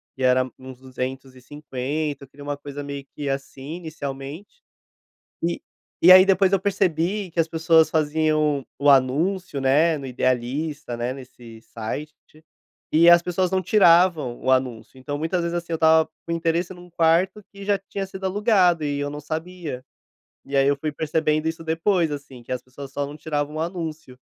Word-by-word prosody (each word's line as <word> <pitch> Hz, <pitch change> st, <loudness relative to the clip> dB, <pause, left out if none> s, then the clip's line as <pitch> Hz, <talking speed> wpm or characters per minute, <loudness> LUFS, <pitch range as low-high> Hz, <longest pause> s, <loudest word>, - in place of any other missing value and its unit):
que 130 Hz, -, -5 dB
era 130 Hz, 0 st, +3 dB
uns 130 Hz, -1 st, -11 dB
€250,00, 130 Hz, +3 st, -5 dB
eu -, -, -12 dB
queria 145 Hz, +2 st, -14 dB
uma 145 Hz, 0 st, -3 dB
coisa 145 Hz, 0 st, -7 dB
meio 140 Hz, -1 st, -6 dB
que, 145 Hz, -2 st, -3 dB
assim, 135 Hz, +2 st, -5 dB
inicialmente 155 Hz, -, -7 dB, 0.8 s
e 170 Hz, +1 st, -1 dB, 0.4 s
e, 180 Hz, -, +9 dB
aí, 185 Hz, 0 st, +10 dB
depois 195 Hz, -1 st, +3 dB
eu 195 Hz, -, +3 dB
percebi 190 Hz, 0 st, 0 dB
que 170 Hz, -, -5 dB
as 165 Hz, -, +3 dB
pessoas 160 Hz, 0 st, +4 dB
faziam 155 Hz, -2 st, +1 dB
o 145 Hz, -, +4 dB
anúncio, 145 Hz, +5 st, +2 dB
né, 150 Hz, +4 st, +3 dB
no 135 Hz, -, -7 dB
Idealista, 130 Hz, +2 st, -2 dB
né, 120 Hz, +2 st, -2 dB
nesse 120 Hz, -4 st, -12 dB
site 150 Hz, +8 st, -8 dB, 0.5 s
e 165 Hz, +2 st, +5 dB
as 170 Hz, 0 st, +8 dB
pessoas 180 Hz, +1 st, -1 dB
não 190 Hz, 0 st, +1 dB
tiravam 170 Hz, -, +4 dB
o 130 Hz, -, -1 dB
anúncio, 130 Hz, -2 st, -1 dB
então, 145 Hz, +2 st, -4 dB
muitas 165 Hz, +3 st, -1 dB
vezes, 170 Hz, 0 st, -2 dB
assim, 170 Hz, -1 st, -3 dB
eu -, -, +2 dB
estava 160 Hz, 0 st, +4 dB, 0.2 s
com 170 Hz, -, -5 dB
o -, -, 0 dB
interesse 170 Hz, +2 st, -1 dB
num 180 Hz, 0 st, -14 dB
quarto 170 Hz, +5 st, +2 dB
e 200 Hz, 0 st, -10 dB
já 205 Hz, 0 st, +2 dB
tinha 195 Hz, 0 st, -5 dB
sido 190 Hz, 0 st, -7 dB
alugado 190 Hz, -4 st, +3 dB
e 145 Hz, -1 st, -1 dB
eu 145 Hz, -, -2 dB
não 145 Hz, -, -6 dB
sabia 160 Hz, -3 st, -6 dB, 0.6 s
e 140 Hz, 0 st, -3 dB
aí 135 Hz, -, +4 dB
eu 145 Hz, -, +2 dB
fui 150 Hz, +2 st, -3 dB
percebendo 155 Hz, 0 st, 0 dB
isso 165 Hz, 0 st, -5 dB
depois, 165 Hz, +1 st, +1 dB
assim, 140 Hz, -4 st, -8 dB
que 120 Hz, -, -7 dB
as 125 Hz, -1 st, -3 dB
pessoas 135 Hz, +1 st, -11 dB
só 140 Hz, 0 st, -2 dB
não 145 Hz, -, -9 dB
tirava 150 Hz, -1 st, -3 dB
anúncio. 160 Hz, -7 st, -6 dB
155 Hz, 180 wpm, -23 LUFS, 135-170 Hz, 0.8 s, aí